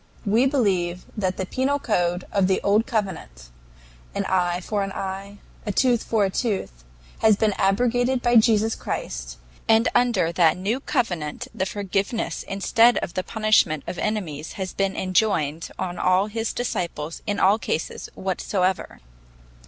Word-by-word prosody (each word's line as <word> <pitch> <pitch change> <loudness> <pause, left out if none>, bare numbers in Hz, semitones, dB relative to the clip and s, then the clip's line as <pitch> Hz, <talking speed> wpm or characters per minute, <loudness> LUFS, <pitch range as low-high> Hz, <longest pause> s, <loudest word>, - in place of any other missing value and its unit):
"We 225 +6 +3
believe 185 -10 0
that 190 -4 -1
the 190 - -2
penal 265 +8 0
code 180 -8 0
of 195 -3 +2
the 190 - +2
old 210 +3 +3
covenant 160 - -4 0.6
an - - -1
eye 180 -1 +1
for 205 +3 -2
an 195 0 -2
eye, 195 +1 -5 0.3
and - - -18
a - - +1
tooth 240 +2 +2
for 215 -3 +1
a 190 - -1
tooth 190 - -2 0.4
has 220 -1 +5
been 210 0 +1
abrogated 245 +6 +2
by 240 0 +5
Jesus 220 0 +4
Christ, - - -5 0.3
and 225 +1 +5
that - - +1
under 230 -9 +2
the 165 -2 +4
new 200 +7 -1
covenant 175 - -2
the 190 - -1
forgiveness 200 +3 -2
instead 225 +5 +3
of 170 - -3
the 185 - -1
punishment 215 -10 +2
of 180 - -5
enemies 165 -9 -3
has 190 -3 -5
been 195 0 -1
enjoined 185 -5 0
on 180 -1 -4
all 185 +2 +3
his 225 +1 -3
disciples 170 -9 -3
in 205 -1 -1
all 200 +4 +4
cases 165 - -3
whatsoever. 190 0 -1
195 Hz, 160 wpm, -24 LUFS, 180-220 Hz, 0.6 s, has